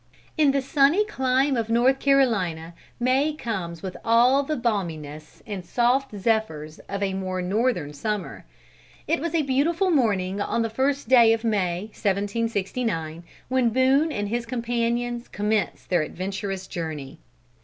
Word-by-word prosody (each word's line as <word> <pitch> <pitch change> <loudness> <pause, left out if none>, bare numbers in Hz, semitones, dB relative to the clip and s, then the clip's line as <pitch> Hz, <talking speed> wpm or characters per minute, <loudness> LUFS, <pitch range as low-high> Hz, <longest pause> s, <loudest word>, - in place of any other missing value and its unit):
In 305 -3 +4
the 275 0 +1
sunny 290 +9 +3
clime 265 -6 +1
of 225 -2 -2
North 250 +4 +3
Carolina 195 - +1 0.3
May 265 +5 +2
comes 185 - -5
with 190 -2 -5
all 245 +4 +4
the 305 +2 -2
balminess 160 - -4
and 200 -4 -5
soft 245 +3 +1
zephyrs 185 -8 -1
of 200 0 -2
a 195 -1 -1
more 185 -1 -3
northern 190 - 0
summer. 210 +7 -4 0.6
It 335 - +1
was 335 +1 -3
a 320 - +2
beautiful 320 +8 +1
morning 200 - +1
on 230 +3 0
the 225 - -3
first 270 +2 0
day 235 -3 +6
of 225 0 -2
May, 185 -6 0
1769, 200 -4 -2 0.3
when 255 -2 +2
Boone 265 +6 +3
and 205 -6 -3
his 235 +1 -2
companions 240 0 -2
commenced 210 -2 -2
their 175 -2 +3
adventurous 190 +3 -4
journey. 155 -7 -6
230 Hz, 145 wpm, -24 LUFS, 190-260 Hz, 0.6 s, day